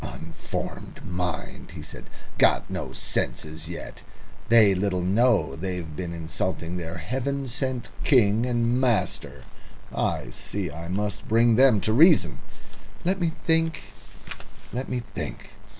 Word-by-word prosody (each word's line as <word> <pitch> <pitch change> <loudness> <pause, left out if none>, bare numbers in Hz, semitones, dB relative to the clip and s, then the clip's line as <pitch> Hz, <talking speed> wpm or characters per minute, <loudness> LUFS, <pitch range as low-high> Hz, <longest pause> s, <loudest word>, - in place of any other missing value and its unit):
"Unformed - - -6
mind!" 90 -4 -4
he 75 - -7
said. 75 - -9 0.3
"Got - - +4
no - - -4
senses 80 +1 -2
yet! 85 - -7 0.5
They 110 -4 +7
little 95 -1 0
know 100 -2 +3
they've 90 -2 -4
been 85 +1 -4
insulting 85 +1 -3
their 85 0 -5
heaven 135 - -2
sent 130 0 -2
king 115 -5 +4
and 120 +1 +1
master. 115 -8 0 0.5
I - - -1
see 100 -6 -2
I 85 +2 -7
must 100 +2 -2
bring 115 +1 +4
them 130 -3 +6
to 110 +4 +1
reason. 145 - +5 0.7
Let 185 +1 +1
me 165 -2 +1
think 165 0 +2 0.9
let 125 +2 -3
me 125 -1 -2
think." - - -6
100 Hz, 130 wpm, -26 LUFS, 85-125 Hz, 0.9 s, They